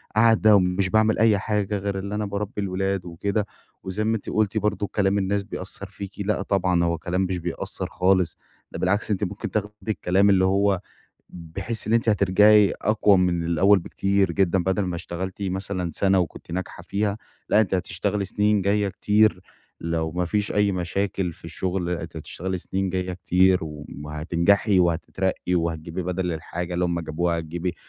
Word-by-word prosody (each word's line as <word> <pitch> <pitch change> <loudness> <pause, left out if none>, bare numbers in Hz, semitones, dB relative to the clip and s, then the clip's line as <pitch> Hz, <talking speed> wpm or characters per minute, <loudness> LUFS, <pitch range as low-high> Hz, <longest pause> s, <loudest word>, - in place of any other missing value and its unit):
قاعدة 110 -1 +5
ومش 95 0 +2
باعمل 110 +2 +3
أي 110 -2 +4
حاجة 105 0 -1
غير 100 0 -3
اللي 100 +2 -4
أنا 105 0 -1
باربي 100 0 -4
الولاد 95 -1 -1
وكده، 100 +5 -2 0.4
وزي 95 +3 -2
ما 110 +1 +1
أنتِ 110 - -5
قلتِ 110 0 0
برضه 105 -1 0
كلام 100 -1 +2
الناس 100 +1 0
بيأثّر - - -6
فيكِ، 100 -1 -8
لأ 100 0 0
طبعًا 95 -3 +1
هو 85 0 0
كلام 90 +3 -2
مش 95 -1 -1
بيأثر 85 -1 -3
خالص، 90 -2 +1 0.3
ده - - -6
بالعكس، 105 +4 +1
أنتِ 105 +1 0
ممكن 100 +1 -4
تاخدي 105 -1 -2 0.2
الكلام 100 0 +2
اللي 95 -1 +4
هو 100 0 +2 0.5
بحيث 95 +7 -5
إن 110 - 0
أنتِ 115 0 +2
هترجعي 105 0 +5
أقوى 105 -2 +4
من 90 -2 +1
الأوّل 95 +5 +4
بكتير 95 +2 0
جدًا، 95 -2 +2
بدل 95 +3 0
ما 90 -2 -2
اشتغلتِ 95 +4 -5
مثلًا 95 -2 -2
سنة 95 -1 +3
وكنتِ 85 -1 -4
ناجحة 95 +1 -5
فيها 105 +1 -1 0.3
لأ، 105 - +5
أنتِ 95 -3 +1
هتشتغلي 100 +2 -1
سنين 105 +1 +1
جايّة 100 +1 +1
كتير، 105 +1 +2 0.4
لو 80 -1 -2
ما 90 0 -1
فيش 105 +3 -1
أي 105 -1 +2
مشاكل 95 +1 -2
في - - -20
الشغل، 90 +1 -3
أنتِ 90 - -4
هتشتغلي 95 +1 -4
سنين 95 +2 -2
جايّة 90 0 -2
كتير 90 +1 +3
وم 75 -1 -9
هتنجحي 85 +6 +2
وهتترقّي 90 +2 -1
وهتجيبي 85 +1 -2
بدل 90 0 -2
الحاجة 85 +2 -5
اللي 90 - +1
هُم 85 -1 -1
جابوها 85 +1 -1
هتجيبي 85 +2 -4
95 Hz, 170 wpm, -24 LUFS, 90-100 Hz, 0.5 s, قاعدة